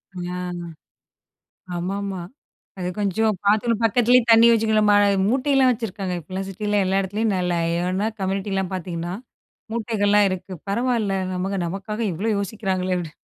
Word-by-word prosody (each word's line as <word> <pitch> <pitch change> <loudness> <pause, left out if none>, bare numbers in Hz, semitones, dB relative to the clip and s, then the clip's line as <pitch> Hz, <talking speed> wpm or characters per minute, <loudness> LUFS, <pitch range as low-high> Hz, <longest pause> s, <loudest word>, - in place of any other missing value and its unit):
ஆ. 180 0 -4 1.4
ஆமாமா 195 +2 -3 0.6
அது 180 - -3
கொஞ்சம் 210 +1 +1
பாத்து 220 +3 +3
பக்கத்துலயே 245 +2 +4
தண்ணி 230 +1 +8
வச்சிக்கணும்மா, 215 -2 +3 0.3
மூட்டையெல்லாம் 265 +1 +3
வச்சுருக்காங்க 205 -6 -3
இப்போலாம், 185 +4 -5
சிட்டில 205 +1 -1
எல்லா 190 +1 +1
எடத்துலயும் 205 +2 -1
நல்லா. 180 -1 0 0.2
ஏன்னா, 185 +4 0
கம்யூனிட்டில 195 0 -1
பாத்தீங்கன்னா, 175 -1 -4 0.6
மூட்டைகள்லாம் 210 -3 +2
இருக்கு. 185 +1 -5 0.2
பரவாயில்ல 230 -2 0 0.2
நமக்கு 190 +2 -2
நமக்காக 200 +5 -4
இவ்ளோ 205 +7 -2
யோசிக்கிறாங்களே 190 -3 -1
அப்டி. 160 -3 -6
200 Hz, 115 wpm, -23 LUFS, 185-220 Hz, 1.4 s, தண்ணி